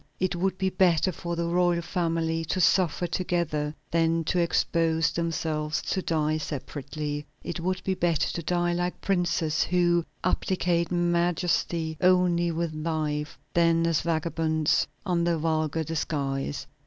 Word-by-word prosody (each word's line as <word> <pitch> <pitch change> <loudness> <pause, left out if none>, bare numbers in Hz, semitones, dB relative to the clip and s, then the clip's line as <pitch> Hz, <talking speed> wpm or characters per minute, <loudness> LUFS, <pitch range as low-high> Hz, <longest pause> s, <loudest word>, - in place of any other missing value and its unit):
It 185 -1 0
would 185 +2 0
be 190 0 0
better 185 -1 +3
for 170 0 -4
the 170 0 -1
royal 175 0 +2
family 165 -1 -1
to 185 - -1
suffer 180 0 +3
together 170 -4 -1 0.2
than 165 0 +2
to 180 +3 0
expose 165 -1 +2
themselves 160 -2 -1
to 190 - -1
die 155 -2 0
separately. 145 0 -5 0.2
It 170 - -4
would 185 +2 -2
be 190 - 0
better 170 -4 +1
to 170 - -3
die 175 +1 0
like 175 +1 -2
princes, 170 -5 0
who 175 -1 +2 0.2
abdicate 180 -2 0
majesty 175 -2 0
only 180 -2 +3
with 165 -1 -2
life, 155 -1 -2 0.2
than 165 -1 +3
as 165 -2 +2
vagabonds, 160 -1 +1 0.2
under 170 -2 +1
a - - 0
vulgar 155 0 0
disguise. 145 -3 -2
170 Hz, 140 wpm, -27 LUFS, 155-175 Hz, 0.2 s, better